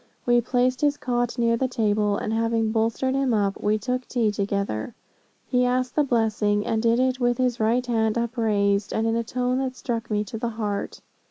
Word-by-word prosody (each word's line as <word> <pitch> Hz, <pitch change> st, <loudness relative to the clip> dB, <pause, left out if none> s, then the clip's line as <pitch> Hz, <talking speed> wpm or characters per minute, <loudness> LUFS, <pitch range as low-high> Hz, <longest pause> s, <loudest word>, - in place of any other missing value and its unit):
We 240 Hz, 0 st, +4 dB
placed 250 Hz, +1 st, 0 dB
his 290 Hz, -1 st, +2 dB
cot 245 Hz, -2 st, -1 dB
near 230 Hz, -1 st, +2 dB
the 260 Hz, +3 st, 0 dB
table, 210 Hz, -4 st, +1 dB
and 220 Hz, -, -3 dB
having 225 Hz, -1 st, +1 dB
bolstered 230 Hz, +4 st, 0 dB
him 270 Hz, -3 st, +1 dB
up, 200 Hz, -2 st, 0 dB
we 210 Hz, +1 st, +2 dB
took 250 Hz, +3 st, -3 dB
tea 230 Hz, -4 st, +1 dB
together. 200 Hz, -, -2 dB, 0.5 s
He 250 Hz, -1 st, +2 dB
asked 250 Hz, 0 st, 0 dB
the 300 Hz, -, +4 dB
blessing, 215 Hz, -5 st, +1 dB
and 220 Hz, -1 st, 0 dB
did 230 Hz, +1 st, +2 dB
it 255 Hz, 0 st, +1 dB
with 245 Hz, -1 st, +1 dB
his 250 Hz, -2 st, 0 dB
right 235 Hz, +3 st, +1 dB
hand 225 Hz, -2 st, 0 dB
upraised, 210 Hz, -4 st, 0 dB
and 220 Hz, -, 0 dB
in 225 Hz, 0 st, +1 dB
a 230 Hz, -, 0 dB
tone 250 Hz, +2 st, -1 dB
that 260 Hz, -1 st, -2 dB
struck 230 Hz, -2 st, -4 dB
me 210 Hz, -1 st, 0 dB
to 215 Hz, +2 st, -7 dB
the 235 Hz, -, -1 dB
heart. 210 Hz, -3 st, -4 dB
230 Hz, 200 wpm, -24 LUFS, 215-250 Hz, 0.5 s, We